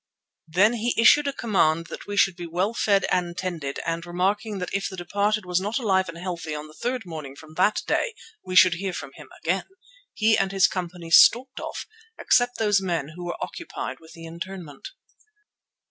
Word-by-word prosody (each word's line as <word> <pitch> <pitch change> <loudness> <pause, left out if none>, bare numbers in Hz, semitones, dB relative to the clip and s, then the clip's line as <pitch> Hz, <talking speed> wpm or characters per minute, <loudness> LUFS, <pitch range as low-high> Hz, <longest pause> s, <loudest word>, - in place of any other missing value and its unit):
Then 190 +8 +4
he 235 0 -1
issued 285 +6 +6
a - - +1
command 165 - +1
that - - -8
we 205 0 -4
should 195 -2 +4
be 175 0 -7
well 180 +6 -1
fed 200 -4 +2
and 175 -1 0
tended, 165 -7 -4
and 165 0 -2
remarking 195 +5 -1
that 180 -2 -5
if 195 0 -1
the 190 - -9
departed 200 +3 0
was 180 0 0
not 210 +4 -2
alive 190 -7 +1
and 165 - -8
healthy 170 -3 -5
on 150 0 -6
the 155 - -14
third 245 +5 -3
morning 155 -5 -7
from 155 +2 -14
that 190 +5 +2
day, 470 -2 0 0.3
we 185 - -5
should 185 -1 +7
hear 185 +2 -3
from 135 - -6
him - - -13
again, 185 +4 0 0.5
he 220 0 +4
and 195 0 0
his 195 -1 +4
company 175 -2 -4
stalked 255 +8 +6
off, - - -6 0.3
except 245 0 +2
those 205 -3 +2
men 170 -6 -2
who 175 +3 -9
were 175 - -4
occupied 180 - -6
with 160 0 -16
the 165 0 -11
interment. 170 -2 -8
185 Hz, 195 wpm, -25 LUFS, 170-205 Hz, 0.5 s, should